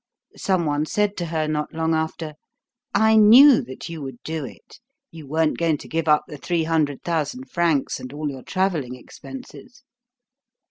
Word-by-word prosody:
Some 185 -3 0
one 150 +1 0
said 210 +2 0
to 175 - -3
her 160 -1 -1
not 150 0 -3
long 160 0 0
after: 160 0 -3 0.6
"I 220 +2 +4
knew 240 +6 +8
that 130 +4 -9
you 165 -2 -7
would 135 -3 -7
do 160 -1 -4
it. 130 - -12 0.3
You 160 -3 -11
weren't 155 +2 0
going 165 -3 +1
to - - -12
give 165 0 -2
up 150 -1 +4
the 150 - -9
three 170 +1 -1
hundred 155 -3 0
thousand 170 - -3
francs 165 -5 0
and 130 - -8
all 150 +1 -4
your 135 -1 -9
travelling 165 -8 -1
expenses." 250 - -12
160 Hz, 175 wpm, -23 LUFS, 150-185 Hz, 0.6 s, knew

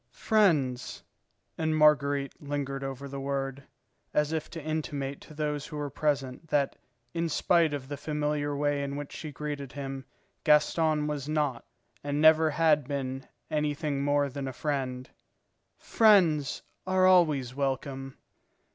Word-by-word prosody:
"Friends," 150 - +1 0.6
and 160 -1 +1
Marguerite 145 -2 +3
lingered 140 -1 -3
over 135 0 -5
the 140 0 -6
word, 135 0 -3 0.5
as 150 0 +2
if 160 -1 -3
to 165 -3 -8
intimate 145 -3 -3
to 155 - -13
those 150 -1 -2
who 155 -5 -7
were 145 -1 -3
present 140 0 -1
that 145 -2 +1 0.4
in 165 0 -1
spite 165 0 +3
of 140 -3 -4
the 145 0 -5
familiar 150 -1 -1
way 145 0 +1
in 140 0 -3
which 145 0 -6
she 155 - -6
greeted 145 -1 -5
him, 135 -1 -5 0.4
Gaston 150 0 +3
was 150 -1 -3
not 150 -5 -1 0.4
and 145 0 -1
never 155 0 +6
had 150 -3 +3
been 135 -2 -4 0.2
anything 150 -1 -1
more 145 0 +2
than 140 0 -5
a 130 - -5
friend, 130 -2 -3 0.7
"friends 175 - +3 0.2
are 185 0 +3
always 155 -9 +4
welcome." 135 0 -3
145 Hz, 140 wpm, -29 LUFS, 140-155 Hz, 0.7 s, never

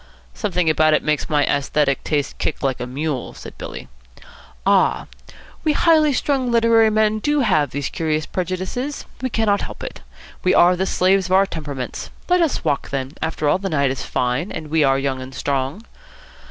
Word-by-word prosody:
"Something 180 -6 -1
about 155 0 +4
it - - 0
makes 150 +1 -1
my 150 -2 +3
aesthetic 140 0 0
taste 145 -3 -2
kick - - -2
like 135 -2 0
a 125 - -4
mule," 140 0 -3
said - - -10
Billy. - - -7 0.8
"Ah, - - +3 0.6
we 310 -2 +2
highly 310 -1 +4
strung 265 -1 0
literary 230 -1 +4
men 215 0 +2
do 295 +5 +1
have 155 - +2
these 140 +1 -3
curious 155 -1 -1
prejudices. 185 - -4 0.2
We 260 - -1
cannot 215 -3 +1
help - - -7
it. - - -7 0.4
We 185 +1 +3
are 180 +1 +6
the 190 +2 -1
slaves 190 0 +2
of 185 - -1
our 195 +1 +5
temperaments. 145 -8 -6 0.2
Let 360 0 +4
us 325 -4 0
walk, 140 - 0
then. 135 -1 -3
After 160 -1 -1
all, 145 - +3
the 195 0 -3
night 140 -5 +1
is 135 - -4
fine, 125 +9 -1
and 155 -2 -7
we 160 -1 +3
are 135 -1 +3
young 135 -1 -2
and 130 +1 -9
strong." 140 - -2
160 Hz, 185 wpm, -21 LUFS, 140-215 Hz, 0.8 s, are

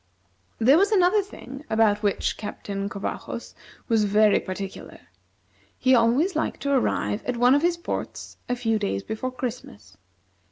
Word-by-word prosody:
There 265 +8 +5
was 400 +2 +3
another 400 +1 +4
thing 275 -8 -10
about 215 -2 +3
which 205 -2 0
Captain 200 -1 -5
Covajos 200 -1 -6 0.3
was 225 -3 +2
very 210 +1 +4
particular; 190 0 -7 0.8
he 260 - +3
always 255 +10 +3
liked 315 - -2
to 280 - -1
arrive 240 -4 0
at 250 -1 -2
one 245 +2 +5
of 290 - +3
his 345 +1 +1
ports 340 - -6
a 245 - +1
few 225 -3 0
days 100 - -2
before 220 +4 -4
Christmas. 230 - -7
235 Hz, 150 wpm, -25 LUFS, 205-280 Hz, 0.8 s, There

